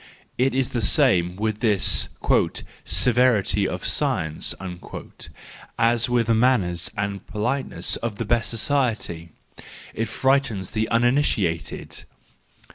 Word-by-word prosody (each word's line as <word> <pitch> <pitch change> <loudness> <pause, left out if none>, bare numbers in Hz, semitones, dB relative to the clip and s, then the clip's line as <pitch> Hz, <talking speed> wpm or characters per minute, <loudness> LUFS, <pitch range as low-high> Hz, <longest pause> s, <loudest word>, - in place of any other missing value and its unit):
It 130 +1 +1
is 130 -1 +1
the 120 - -2
same 95 - +3
with 110 +1 -2
this 105 -5 +2 0.8
"severity 115 -6 +3
of - - -5
science" 80 -1 0 1.2
as 115 +1 +2
with 120 -1 +2
the 115 - +2
manners 110 -8 +2
and 100 -1 -3
politeness 120 +6 -2
of 115 -3 -4
the 115 - -4
best 115 +1 +1
society: 115 - -1 0.6
it 115 - -2
frightens 125 -4 0
the 110 -1 -1
uninitiated. 115 - 0
115 Hz, 110 wpm, -23 LUFS, 100-125 Hz, 1.2 s, same